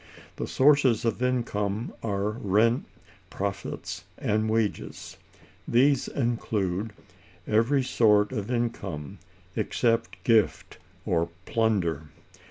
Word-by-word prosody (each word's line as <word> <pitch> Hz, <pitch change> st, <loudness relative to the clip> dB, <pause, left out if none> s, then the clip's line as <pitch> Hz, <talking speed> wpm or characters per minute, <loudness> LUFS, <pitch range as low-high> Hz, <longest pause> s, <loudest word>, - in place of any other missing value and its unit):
The -, -, -3 dB
sources 135 Hz, -5 st, +4 dB
of 115 Hz, +1 st, -1 dB
income 115 Hz, -4 st, -1 dB
are 100 Hz, -1 st, -1 dB
rent, 110 Hz, +3 st, +2 dB, 0.4 s
profits, -, -, -4 dB
and 110 Hz, +1 st, 0 dB
wages. 110 Hz, -2 st, -2 dB, 0.5 s
This 135 Hz, +2 st, +3 dB
includes 110 Hz, -5 st, -1 dB, 0.5 s
every 115 Hz, +6 st, +2 dB
sort 105 Hz, -4 st, +3 dB
of 105 Hz, -4 st, -4 dB
income, 105 Hz, -, -3 dB, 0.4 s
except 115 Hz, -1 st, 0 dB
gift 115 Hz, -3 st, +2 dB, 0.3 s
or 85 Hz, -1 st, +1 dB, 0.2 s
plunder. 90 Hz, -9 st, 0 dB
110 Hz, 90 wpm, -27 LUFS, 100-120 Hz, 0.5 s, sources